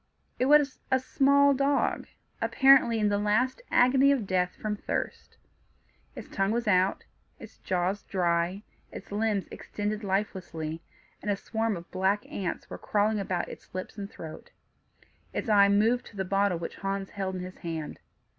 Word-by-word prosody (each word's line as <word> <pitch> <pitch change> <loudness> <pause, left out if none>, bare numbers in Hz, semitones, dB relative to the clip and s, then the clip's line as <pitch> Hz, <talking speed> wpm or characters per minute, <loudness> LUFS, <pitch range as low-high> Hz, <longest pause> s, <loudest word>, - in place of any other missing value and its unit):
It 255 - +2
was 290 -1 +4
a 260 - +3
small 280 +2 +4
dog, 280 +1 +1 0.3
apparently 265 -4 +5
in 210 -1 +2
the 205 0 +1
last 220 - +1
agony 265 +3 +5
of 265 -7 +1
death 180 -1 0
from 210 -1 -2
thirst. - - -4 0.8
Its - - -8
tongue 195 0 0
was 230 +1 -1
out, 185 -1 +2 0.3
its - - -13
jaws 185 +2 -1
dry, 175 +1 0 0.3
its - - -10
limbs 210 -1 0
extended 210 +1 -4
lifelessly, 185 -5 -3 0.4
and 210 - -4
a 205 - +2
swarm 220 0 -2
of 170 - -12
black 190 +2 0
ants 185 -4 -4
were - - -8
crawling 210 +1 +1
about 185 -3 -2
its - - -12
lips 185 - -5
and 200 -2 -6
throat. 160 -6 -10 0.8
Its 245 - -3
eye 200 -1 +6
moved 220 +5 +2
to - - -15
the 190 -1 -2
bottle 195 -1 +1
which 165 - -6
Hans 195 0 -3
held 190 -2 -3
in 185 - -4
his 185 0 -9
hand. 160 -3 -5
205 Hz, 165 wpm, -28 LUFS, 185-225 Hz, 0.8 s, eye